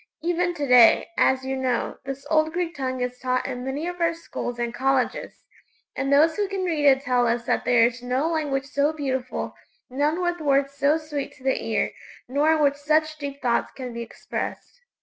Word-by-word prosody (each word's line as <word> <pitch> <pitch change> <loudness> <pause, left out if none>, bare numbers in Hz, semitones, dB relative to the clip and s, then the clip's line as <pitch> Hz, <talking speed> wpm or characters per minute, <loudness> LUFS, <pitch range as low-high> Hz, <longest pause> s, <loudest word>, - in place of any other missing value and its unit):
Even 350 +1 0
to 290 - -2
day, 250 -3 +6
as 265 0 +2
you 265 0 -2
know, 260 -2 -1
this 270 +1 -6
old 310 0 +3
Greek 345 -1 -2
tongue 260 -3 -3
is 250 0 -3
taught 255 -1 -1
in 250 -2 -4
many 270 +4 -3
of 355 0 -5
our 335 0 +2
schools 245 -7 -6
and 240 0 -2
colleges, 265 +1 -1 0.5
and 275 +1 -1
those 315 +3 +5
who 410 -1 0
can 390 -1 -3
read 320 -5 0
it 265 -1 +5
tell 250 -2 +2
us 235 0 0
that - - 0
there 240 -2 +5
is 240 +1 -2
no 255 +5 0
language 295 -5 -1
so 285 +2 0
beautiful; 265 -4 -3 0.4
none 295 +6 0
with 350 -1 -1
words 275 -1 +2
so 280 +2 +2
sweet 300 -3 -5
to 260 - -19
the 265 0 0
ear, - - 0 0.4
nor 290 +5 +2
in 315 - +1
which 285 0 +2
such 310 +1 +1
deep 280 -1 -6
thoughts 240 -2 +1
can 250 -3 -7
be 235 - -5
expressed. - - -6
275 Hz, 205 wpm, -24 LUFS, 255-310 Hz, 0.5 s, day